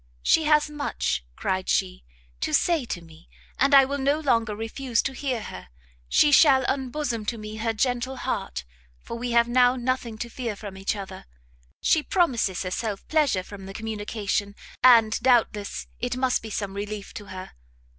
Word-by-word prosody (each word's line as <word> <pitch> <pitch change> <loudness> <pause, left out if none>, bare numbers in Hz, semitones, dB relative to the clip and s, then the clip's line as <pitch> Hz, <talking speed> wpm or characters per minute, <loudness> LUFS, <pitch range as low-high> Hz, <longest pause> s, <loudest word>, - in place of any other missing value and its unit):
"She 320 - +4
has 300 0 +4
much," 285 - -2
cried 185 0 -2
she, - - 0 0.4
"to 155 - +1
say 330 -7 +2
to 175 -7 -5
me, 165 0 -17 0.3
and 280 +1 +5
I 270 -1 +8
will 280 +1 -3
no 280 +3 +1
longer 230 -7 +1
refuse 230 +2 -2
to 270 - -2
hear 260 -5 -3
her; 90 - -9 0.4
she 295 - +5
shall 270 -3 +6
unbosom 265 -3 -2
to 235 - -1
me 215 0 -7
her 225 +1 0
gentle 245 +3 -1
heart, - - -3 0.3
for - - -7
we 245 +1 -4
have 235 0 +4
now 245 +1 +4
nothing 245 -2 -2
to 240 - -4
fear 235 -2 -4
from 200 -1 -8
each 195 +2 -2
other. 195 -2 -8 0.6
She 315 - +4
promises 255 - +1
herself 195 +2 -4
pleasure 295 -12 +2
from 195 0 -10
the 195 - -9
communication, 210 -2 -3 0.3
and 230 -3 +6
doubtless 225 -5 +1
it 245 +1 -2
must 255 -1 +1
be 220 - -8
some 200 -2 -3
relief 205 0 -6
to 205 - -8
her. 185 -1 -8
230 Hz, 175 wpm, -25 LUFS, 200-265 Hz, 0.6 s, I